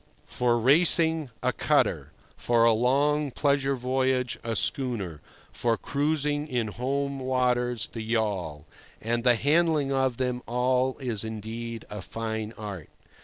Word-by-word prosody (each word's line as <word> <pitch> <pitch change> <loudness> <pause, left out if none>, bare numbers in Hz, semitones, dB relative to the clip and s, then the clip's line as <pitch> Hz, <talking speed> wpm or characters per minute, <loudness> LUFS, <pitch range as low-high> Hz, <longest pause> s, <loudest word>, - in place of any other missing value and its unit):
For 120 -1 +1
racing, 160 +3 +4
a - - +1
cutter; - - +1 0.2
for 115 -1 +2
a 115 - +5
long 140 +5 +2
pleasure 140 0 +1
voyage, 130 0 0
a 115 -1 -2
schooner; 100 - -2 0.3
for 115 -2 0
cruising 145 +1 -1
in 120 -6 -1
home 140 +4 -2
waters, 125 -3 0
the 115 - -7
yawl; 105 -9 -2 0.3
and 115 +1 -1
the 125 -1 +5
handling 150 +1 +2
of 130 -3 +1
them 125 -1 -1
all 125 +2 +1
is 120 -6 -2
indeed 110 +1 -6
a 105 -1 -5
fine 110 0 -4
art. 100 -7 -7
125 Hz, 130 wpm, -27 LUFS, 115-140 Hz, 0.3 s, a